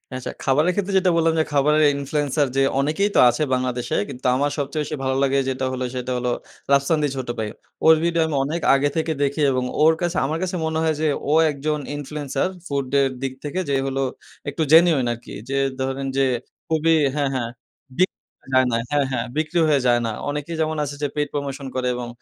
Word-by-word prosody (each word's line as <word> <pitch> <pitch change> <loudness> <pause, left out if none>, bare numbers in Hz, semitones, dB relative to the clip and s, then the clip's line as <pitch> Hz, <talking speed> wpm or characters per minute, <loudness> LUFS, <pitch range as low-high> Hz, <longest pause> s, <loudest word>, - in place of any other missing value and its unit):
আচ্ছা, 130 - -5
খাবারের 150 +6 +3
ক্ষেত্রে 200 -1 -1
যেটা 185 -1 +2
বললাম 165 0 +3
যে, - - +4
খাবারের 150 +2 +3
ইনফ্লুয়েন্সার 145 0 0
যে - - +4 0.2
অনেকেই 155 +9 +1
তো - - +5
আছে 120 +6 0
বাংলাদেশে। 125 -1 -1
কিন্তু 125 - -9
আমার 145 +2 +1
সবচেয়ে 145 +1 -2
বেশি 150 - -4
ভালো 130 0 0
লাগে 140 0 +2
যেটা 130 0 -2
হলো, 130 0 -3
সেটা 125 0 -3
হলো 125 0 -1 0.4
রাফসান 140 +3 +3
দি - - +3
ছোট 130 -1 -4
ভাই। 110 - -1 0.4
ওর 160 0 +8
ভিডিও 170 -1 +1
আমি 155 - -2
অনেক 155 +4 -3
আগে 140 +1 +3
থেকে 160 0 0
দেখি 140 +2 -1
এবং 130 -1 0 0.2
ওর 160 +1 +6
কাছে 175 0 -1
আমার 155 +4 -1
কাছে 185 0 -2
মনে 160 0 -1
হয় 160 -1 +2
যে 155 - +2 0.2
ও - - +4 0.2
একজন 150 +2 -2 0.2
ইনফ্লুয়েন্সার 145 0 -2 0.2
ফুডের 140 -1 +1
দিক 135 -1 -2
থেকে। 150 +5 -3
যে - - +1
হলো 135 0 -1 0.5
একটু 160 - -4
জেনুইন 160 -5 +6
আরকি। 120 0 -11 0.2
যে 135 - -1 0.3
ধরেন 135 +1 -2
যে 135 - +4 0.4
খুবই 165 0 +2 0.2
হ্যাঁ, 140 -2 +1
হ্যাঁ 120 -3 -2 0.5
বিক 185 - +4 0.3
হয়ে - - -15
যায় 130 0 +5
না 115 - +2
হ্যাঁ, 145 -1 +2
হ্যাঁ। 120 -2 -1
বিক্রি 155 +2 0
হয়ে 145 -3 +3
যায় 120 -1 +4
না। 115 - -1 0.2
অনেকেই 150 +3 -4
যেমন 155 0 -1
আছে 145 0 -5
যে, 145 - +1
পেইড 145 -1 -1
প্রমোশন 140 -1 -4
করে 130 -1 0
এবং 120 -1 -5
140 Hz, 210 wpm, -22 LUFS, 130-155 Hz, 0.5 s, ওর